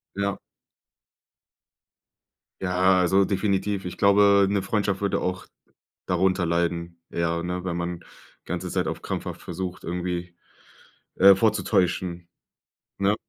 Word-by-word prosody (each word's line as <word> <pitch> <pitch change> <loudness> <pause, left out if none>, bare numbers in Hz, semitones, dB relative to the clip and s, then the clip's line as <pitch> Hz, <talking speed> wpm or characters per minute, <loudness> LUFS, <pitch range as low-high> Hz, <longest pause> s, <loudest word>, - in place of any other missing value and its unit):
Ja. 100 0 -1 2.2
Ja, 95 0 +3
also 95 +2 +4
definitiv. 100 0 -1
Ich 90 0 -6
glaube, 100 0 +5
'ne 100 -1 0
Freundschaft 100 -1 -1
würde 100 -2 0
auch 90 +1 -3 0.6
darunter 90 0 +1
leiden. 85 0 -1
Ja, 85 0 -1
ne, 90 +1 -4
wenn 90 -2 -2
man 85 0 -4 0.4
ganze - - -4
Zeit - - -1
auf - - -5
krampfhaft - - -5
versucht, 90 +1 -6
irgendwie, 90 0 -4 0.8
äh, 100 +1 +8
vorzutäuschen, 90 -4 0 0.7
ne? 100 +1 +2
90 Hz, 115 wpm, -25 LUFS, 85-100 Hz, 2.2 s, äh